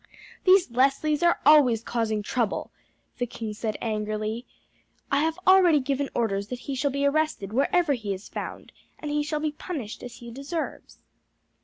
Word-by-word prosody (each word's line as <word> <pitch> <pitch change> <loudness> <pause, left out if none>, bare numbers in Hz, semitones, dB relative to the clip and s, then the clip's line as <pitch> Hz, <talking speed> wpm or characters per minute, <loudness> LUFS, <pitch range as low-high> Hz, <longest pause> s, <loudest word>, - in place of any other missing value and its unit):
"These 370 -7 +5
Leslies 275 +4 +2
are 345 0 +3
always 265 -7 +6
causing 220 -3 -1
trouble," 230 -1 -1 0.5
the 245 - 0
king 220 -2 -5
said 215 0 -3
angrily. 215 +1 -2 0.6
"I 280 - +3
have 320 +2 0
already 365 -5 +6
given 275 +1 -1
orders 200 -4 0
that 245 +2 -6
he 280 - -5
shall 275 +2 0
be 280 +1 -1
arrested 280 -9 0
wherever 290 +5 +2
he 215 -6 -3
is 195 +1 -5
found, - - -7 0.3
and 300 - -5
he 295 0 +1
shall 300 +1 -2
be 305 -1 0
punished 295 - -6
as 245 -1 -8
he 235 -1 -10
deserves." 280 +6 -5
265 Hz, 165 wpm, -26 LUFS, 225-300 Hz, 0.6 s, always